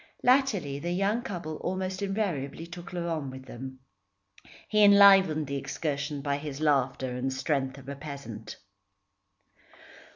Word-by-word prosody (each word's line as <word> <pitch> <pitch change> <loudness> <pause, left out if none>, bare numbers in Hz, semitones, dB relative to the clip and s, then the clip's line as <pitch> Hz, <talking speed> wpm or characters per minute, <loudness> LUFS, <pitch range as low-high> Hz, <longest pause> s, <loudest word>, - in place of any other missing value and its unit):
Latterly 220 - +2
the 170 +4 -3
young 200 +5 +1
couple 170 -10 -5
almost 185 +1 -3
invariably 175 -8 -2
took 175 +2 -9
Laurent 170 -5 -3
with 130 0 -9
them. 130 +1 -9 0.9
He 210 -1 +4
enlivened 195 -6 +7
the 140 0 -3
excursion 145 0 -3
by 140 -1 0
his 145 -1 -6
laughter 135 -4 +1
and 130 +1 -1
strength 135 0 -1
of 135 -1 -13
a 140 - -5
peasant. 140 -7 -8
150 Hz, 130 wpm, -28 LUFS, 135-185 Hz, 0.9 s, enlivened